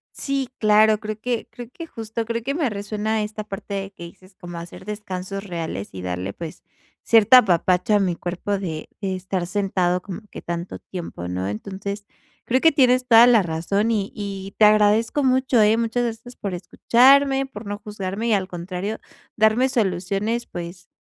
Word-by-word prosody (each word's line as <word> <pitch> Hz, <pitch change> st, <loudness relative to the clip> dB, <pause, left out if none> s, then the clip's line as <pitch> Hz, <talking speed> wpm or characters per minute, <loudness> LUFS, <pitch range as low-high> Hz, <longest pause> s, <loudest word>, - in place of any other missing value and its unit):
Sí, 275 Hz, -2 st, -2 dB
claro. 215 Hz, 0 st, +5 dB
Creo 215 Hz, -1 st, -6 dB
que 240 Hz, -1 st, -2 dB
creo 240 Hz, -1 st, -9 dB
que, 335 Hz, -, -8 dB
justo, 225 Hz, -3 st, -5 dB
creo 230 Hz, +1 st, -3 dB
que, 275 Hz, +4 st, -2 dB
me 290 Hz, -7 st, 0 dB
resuena 210 Hz, +1 st, -2 dB
esta 215 Hz, 0 st, -5 dB
parte, 200 Hz, 0 st, -7 dB
de 195 Hz, 0 st, -3 dB
que 170 Hz, -, -10 dB
dices, 185 Hz, +3 st, -14 dB
como 175 Hz, -1 st, -9 dB
hacer 170 Hz, +2 st, -10 dB
descansos 195 Hz, -1 st, -5 dB
reales, 165 Hz, -, -5 dB
y 95 Hz, -, -7 dB
darle, 90 Hz, +2 st, -3 dB
pues, 165 Hz, -2 st, -8 dB, 0.4 s
cierto 225 Hz, +2 st, +6 dB
apapacho 185 Hz, -2 st, +3 dB
a 205 Hz, -, +4 dB
mi 180 Hz, -3 st, 0 dB
cuerpo, 180 Hz, +4 st, -3 dB
de 160 Hz, -5 st, -5 dB
de 195 Hz, -2 st, -2 dB
estar 185 Hz, -1 st, -3 dB
sentado, 185 Hz, -2 st, 0 dB
como 195 Hz, +2 st, -7 dB
que -, -, -9 dB
tanto 170 Hz, +1 st, -5 dB
tiempo, 165 Hz, -, -7 dB
¿no? 90 Hz, +1 st, -3 dB
Entonces, 200 Hz, -, -5 dB, 0.4 s
creo 260 Hz, +2 st, +1 dB
que 325 Hz, -, +5 dB
tienes 255 Hz, -3 st, +3 dB
toda 230 Hz, 0 st, +8 dB
la 235 Hz, -4 st, +6 dB
razón. 180 Hz, +6 st, -1 dB
Y 205 Hz, -3 st, 0 dB
y 195 Hz, -1 st, -6 dB
te 215 Hz, -, +6 dB
agradezco 215 Hz, +6 st, +4 dB
mucho, 260 Hz, -2 st, +3 dB
¿eh? 215 Hz, +1 st, +4 dB
Muchas 230 Hz, +1 st, 0 dB
gracias 235 Hz, +1 st, -6 dB
por 200 Hz, -3 st, -4 dB
escucharme, 270 Hz, +8 st, +4 dB
por 215 Hz, -4 st, -10 dB
no 205 Hz, 0 st, -4 dB
juzgarme, 205 Hz, +1 st, -4 dB
y 225 Hz, -, +2 dB
al 190 Hz, -2 st, +1 dB
contrario, 180 Hz, +4 st, -5 dB, 0.4 s
darme 220 Hz, +4 st, +4 dB
soluciones, 205 Hz, +1 st, -1 dB
pues, 175 Hz, 0 st, -8 dB
205 Hz, 180 wpm, -22 LUFS, 185-230 Hz, 0.4 s, toda